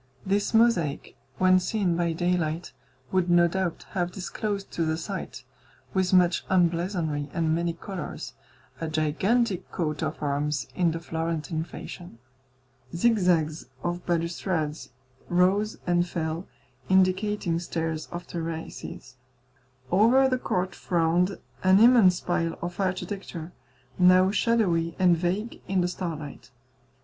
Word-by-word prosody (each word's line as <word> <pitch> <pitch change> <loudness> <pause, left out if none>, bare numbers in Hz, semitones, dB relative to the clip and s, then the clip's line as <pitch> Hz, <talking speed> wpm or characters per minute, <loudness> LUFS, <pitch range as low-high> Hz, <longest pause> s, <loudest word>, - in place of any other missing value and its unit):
This 200 +1 +1
mosaic, 220 -11 +2 0.2
when 185 0 +5
seen 185 -2 0
by 170 -1 +1
daylight, 175 -2 -1 0.4
would 185 -1 +1
no 175 0 +5
doubt 185 -1 -2
have 175 -2 -1
disclosed 200 +2 -4
to 170 - -1
the 160 0 0
sight, 190 +4 -6 0.5
with 190 -2 +1
much 180 -2 +4
emblazonry 170 -4 +1
and 160 -2 +1
many 170 +1 0
colours, 185 +2 -7 0.5
a 165 - -3
gigantic 180 +8 0
coat 155 -4 -2
of - - -2
arms, 145 -2 -1
in 175 -2 +2
the 165 0 -3
Florentine 160 -1 -3
fashion. 175 -4 -9 0.8
Zigzags 175 - +2 0.2
of 175 0 -2
balustrades 170 -2 -1 0.4
rose 190 +4 +2
and 175 0 +2
fell, 160 +1 -3 0.4
indicating 190 -1 +2
stairs 165 -2 -3
of 175 +1 -7
terraces. 160 -6 -6 0.7
Over 235 +8 +5
the 255 -1 0
court 185 -5 -1
frowned 175 +2 +1 0.3
an 190 +1 +6
immense 225 -6 +6
pile 165 -2 -1
of 175 +1 -5
architecture, 185 -3 -3 0.5
now 185 +1 +6
shadowy 185 -8 +1
and 180 -2 +5
vague 185 +7 -2
in 190 -1 +1
the 175 - +1
starlight. 155 -8 -6
175 Hz, 120 wpm, -26 LUFS, 165-190 Hz, 0.8 s, an